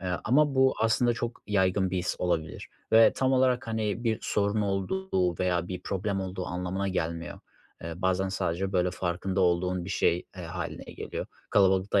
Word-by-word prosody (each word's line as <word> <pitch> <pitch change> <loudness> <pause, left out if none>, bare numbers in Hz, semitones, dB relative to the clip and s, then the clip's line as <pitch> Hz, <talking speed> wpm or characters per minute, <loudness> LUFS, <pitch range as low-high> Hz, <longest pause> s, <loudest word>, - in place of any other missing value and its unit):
Eee, 90 -1 -2
ama 145 +4 +3
bu 130 0 +4
aslında 115 +2 +3
çok 120 +1 -5
yaygın 95 -2 +2
bir 95 - -1
his 90 - -2
olabilir 80 -3 -2 0.2
ve 115 0 +7
tam 130 0 +2
olarak, 130 0 +2
hani, 110 0 -2
bir 110 -2 +1
sorun 105 +1 0
olduğu 95 - -1
veya 90 -1 0
bir 90 -1 -5
problem 95 +1 -2
olduğu 95 -1 -4
anlamına 90 +2 -2
gelmiyor. 85 -2 -3 0.4
Eee, 85 0 -5
bazen 95 +1 0
sadece, 95 +1 -2
böyle, 90 -1 +2
farkında 95 +1 -2
olduğun 90 0 +1
bir 95 - -6
şey, 90 -3 +1
e, 90 - -6
hâline 80 -1 -5
geliyor. - - -6 0.2
Kalabalıkta 95 0 +3
95 Hz, 170 wpm, -28 LUFS, 90-110 Hz, 0.4 s, ve